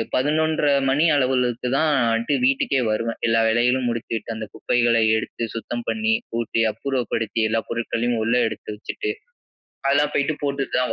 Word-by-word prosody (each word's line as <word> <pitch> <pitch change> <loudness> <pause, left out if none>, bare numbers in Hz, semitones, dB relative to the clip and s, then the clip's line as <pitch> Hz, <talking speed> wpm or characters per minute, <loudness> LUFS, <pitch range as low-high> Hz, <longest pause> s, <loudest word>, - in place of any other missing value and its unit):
11.30 150 +2 +2 0.2
மணி 145 +5 +3
அளவிலுக்கு 125 -3 +1
தான்டு 120 -5 +1
வீட்டுக்கே 135 +1 +2
வருவேன் 115 +2 -2
எல்லா 115 0 +3
வேலைகளும் 125 +2 +2
முடிச்சுட்டு. 115 -1 -4
அந்த 110 0 -5
குப்பைகளை 120 -1 +2 0.2
எடுத்து 115 - -4
சுத்தம் 120 +1 -5
பண்ணி, 220 0 +1 0.2
கூட்டி 115 0 -1
அப்புறப்படுத்தி, 115 -1 -2
எல்லா 115 +1 +1
பொருட்களையும் 115 +1 -1
உள்ள 115 +2 +1
எடுத்து - - -8
வச்சுட்டு, 415 - -5 0.8
அதெல்லாம் 145 +1 +2
போய்ட்டு 145 +2 +1
போட்டுட்டு 140 -1 -1
தான் 125 - 0
120 Hz, 135 wpm, -22 LUFS, 115-140 Hz, 0.8 s, மணி